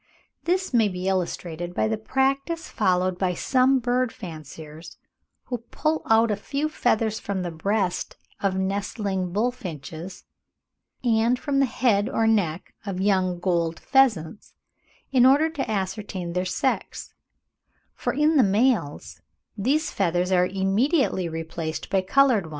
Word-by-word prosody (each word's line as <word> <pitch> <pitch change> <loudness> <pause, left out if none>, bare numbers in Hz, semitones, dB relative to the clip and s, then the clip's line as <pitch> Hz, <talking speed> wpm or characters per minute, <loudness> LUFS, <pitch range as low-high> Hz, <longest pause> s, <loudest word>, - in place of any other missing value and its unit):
This 365 -2 0
may 225 -3 +4
be 180 -1 -4
illustrated 175 -2 -2
by - - +1
the 220 - 0
practice 275 +8 -1
followed 185 -4 +1
by 180 -2 0
some 260 +6 +3
bird 250 0 0
fanciers, 160 -2 -10 0.5
who 245 -2 -4
pull 310 +7 -2
out 225 0 +4
a - - +1
few 280 +9 -3
feathers 220 -6 0
from 195 -2 -3
the 175 - -3
breast 190 +3 -1 0.2
of 195 -1 0
nestling 195 -1 -2
bullfinches, 185 - -4 0.8
and 235 +1 +2
from 280 0 -1
the 275 - +3
head 220 -5 +1
or 225 - +1
neck 190 -7 0
of 195 -3 -4
young 185 -2 +1
gold 170 -2 0
pheasants, 225 - +1 0.6
in 255 -3 +5
order 285 +5 +5
to 275 -6 -4
ascertain 190 -3 -3
their 180 +1 -1
sex; 260 +8 -2 0.8
for - - -2
in 300 +2 +2
the 265 - +6
males, 205 - 0 0.3
these 275 +9 0
feathers 180 -1 0
are 180 -1 +4
immediately 195 - +1
replaced 160 0 -5
by 195 -1 +3
coloured 235 0 +3
ones. - - -11
205 Hz, 140 wpm, -25 LUFS, 180-255 Hz, 0.8 s, the